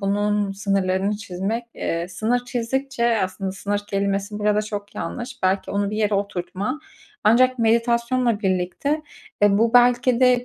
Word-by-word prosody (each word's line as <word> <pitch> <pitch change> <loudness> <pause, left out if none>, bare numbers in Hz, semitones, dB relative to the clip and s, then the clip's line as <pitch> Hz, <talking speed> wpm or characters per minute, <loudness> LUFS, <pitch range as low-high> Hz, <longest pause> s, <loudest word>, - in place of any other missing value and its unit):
bunun 205 0 0
sınırlarını 195 0 0
çizmek, 205 +4 -3
eee, 170 +1 -2
sınır 235 +6 -1
çizdikçe, 245 +1 -2
eee, 230 -2 +3
aslında 190 +1 -4
sınır 205 +1 -2
kelimesi 200 +1 -1
burada 210 0 +2
çok 205 -1 -6
yanlış. 245 -1 -6
Belki 190 +1 +1
onu 200 0 0
bir 215 - -3
yere 210 -1 +1
oturtma. 200 +7 -3 0.4
Ancak 255 +3 +4
meditasyonla 235 0 +2
birlikte, 190 - -1 0.4
eee, 205 0 +5
bu 230 +1 +2
belki 245 0 +4
de 250 -1 +4
210 Hz, 145 wpm, -22 LUFS, 195-240 Hz, 0.4 s, eee